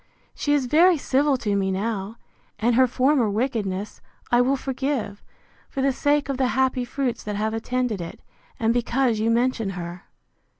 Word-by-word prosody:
She 290 0 +1
is 280 -3 +1
very 330 +7 +5
civil 275 0 +2
to 210 -4 -1
me 195 -1 +1
now: 200 +1 -2 0.4
and 235 +2 +2
her 255 +2 +5
former 255 -1 +2
wickedness 210 -3 -2 0.3
I 240 0 +5
will 265 +3 +2
forgive, 265 -6 -3 0.5
for 270 - -3
the 275 - +3
sake 290 +2 +1
of 275 -2 -2
the 260 -1 +2
happy 260 -1 +1
fruits 255 -1 -2
that 210 -1 -4
have 215 +2 -1
attended 230 -2 -2
it; 170 - -7 0.4
and 225 0 +2
because 245 -1 +1
you 220 +1 +1
mention 235 -2 +1
her. 175 0 -7
245 Hz, 170 wpm, -24 LUFS, 215-270 Hz, 0.5 s, very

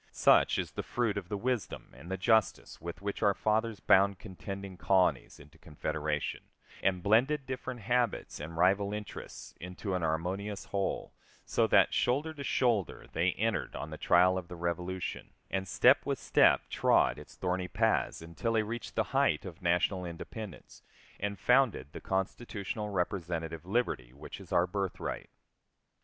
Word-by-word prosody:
Such - - +4
is - - -2
the - - -4
fruit 115 -4 -1
of 95 -3 -5
the 105 - -2
wisdom 120 +1 -3
and 85 - -11
the 95 - -2
justice 110 +1 +1
with 85 +3 -7
which 100 0 -3
our 100 -2 +4
fathers 110 0 0
bound 100 +1 +4
contending 100 -1 -7
colonies 90 +1 +1
into 75 +2 -16
confederation, 75 -1 -3 0.4
and 90 -2 +1
blended 130 +7 +3
different 130 -2 -5
habits 120 +1 0
and 80 +3 -7
rival 100 +3 +3
interests 105 -1 -8
into 90 +3 -5
an 90 - 0
harmonious 90 +6 -2
whole, 100 -1 -2 0.3
so - - +2
that, - - +5
shoulder 145 +6 +1
to 145 -2 -7
shoulder, 120 - 0
they - - +2
entered - - -1
on 75 +1 -5
the 80 - -6
trial 90 +1 +4
of 90 - -10
the 90 - -8
Revolution, 90 +2 -4 0.2
and 95 0 -1
step - - +5
with - - -1
step - - +4
trod - - +3
its - - -13
thorny 90 0 -1
paths 110 -3 0
until 85 +8 -3
they 110 -1 +3
reached 115 +2 -6
the - - +2
height 75 - +2
of 90 0 -9
national 90 +2 +1
independence, 90 +3 -8 0.4
and 100 0 -2
founded 120 - +3
the - - -8
constitutional 100 +2 -3
representative 85 -3 -3
liberty 95 - -1
which 70 +3 -9
is - - -14
our 85 - +4
birthright.... 95 0 -4
95 Hz, 160 wpm, -31 LUFS, 85-110 Hz, 0.4 s, that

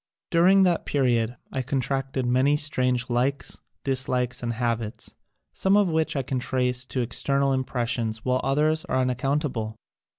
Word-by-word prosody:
During 185 +3 +5
that 175 -3 +1
period 120 -4 +1 0.2
I 130 - -1
contracted 135 0 -2
many 130 +4 +3
strange 125 -4 +1
likes, 125 +3 -1 0.2
dislikes 125 -2 0
and 120 -1 -2
habits, 115 -2 -2 0.4
some 195 +1 +2
of 205 -3 +3
which 160 -1 0
I 135 - 0
can 130 0 -2
trace 125 0 0
to 130 - -1
external 140 +3 +1
impressions 120 -3 -2
while 130 0 +1
others 155 +3 +1
are 130 - -1
unaccountable. 130 -3 -1
130 Hz, 140 wpm, -25 LUFS, 125-140 Hz, 0.4 s, During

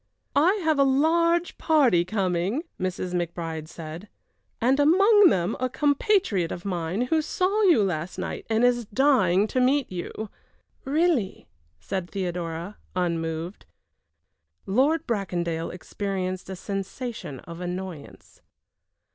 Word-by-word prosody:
"I 335 +8 +4
have 315 -2 +2
a - - +7
large 335 +5 +2
party 270 - +4
coming," 190 - -1 0.2
Mrs. 185 -1 -3
McBride 165 -2 -3
said, 165 +5 -9 0.5
"and 255 +4 +2
among 395 +7 +6
them 180 - 0
a 255 0 0
compatriot 285 - +1
of 175 - -6
mine 180 +1 -2
who 310 +6 +1
saw 375 +7 0
you 330 - +5
last 175 -2 -3
night - - -5
and 225 +1 +2
is 240 -1 +2
dying 210 -6 +3
to 255 - +1
meet 270 0 +2
you." 190 +4 -6 0.5
"Really," 290 - 0 0.3
said 185 -2 -4
Theodora, 175 0 -4 0.2
unmoved. 165 0 -2 1.0
Lord 285 +10 +2
Bracondale 175 -6 -2
experienced 185 0 -4
a 190 - -4
sensation 195 - -5
of 170 +1 -10
annoyance. 180 -4 -7
200 Hz, 120 wpm, -25 LUFS, 175-280 Hz, 1.0 s, a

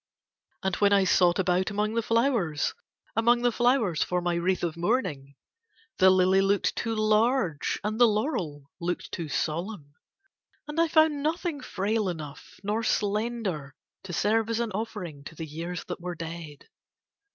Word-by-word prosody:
And 190 -2 0
when 205 -1 +4
I 200 -1 +5
sought 180 -1 +4
about 185 0 +1
among 210 +1 -1
the 230 - +1
flowers, 230 - +1 0.4
among 240 +2 +3
the 245 - +4
flowers 240 - +2
for 180 - +1
my 175 0 -1
wreath 175 +2 0
of 170 -2 -1
mourning, 165 - -1 0.6
the 190 -1 +7
lily 185 +1 +4
looked 195 +1 +1
too 225 -1 -2
large 215 - +1
and 215 +2 -2
the 240 - +9
laurel 180 - -2
looked 175 0 -3
too 165 -3 -4
solemn 155 0 -3 0.7
and 300 +2 0
I 335 - +3
found 315 -2 +3
nothing 315 0 -2
frail 210 -2 -1
enough 155 -4 -8
nor 210 +3 0
slender 210 -9 -1 0.3
to 190 - -8
serve 220 +5 +1
as 230 0 0
an 235 -2 -1
offering 185 -8 -5
to 165 - -9
the 160 - -5
years 165 +3 -5
that - - -6
were 180 0 -4
dead. 160 -3 -8
195 Hz, 160 wpm, -27 LUFS, 170-230 Hz, 0.7 s, the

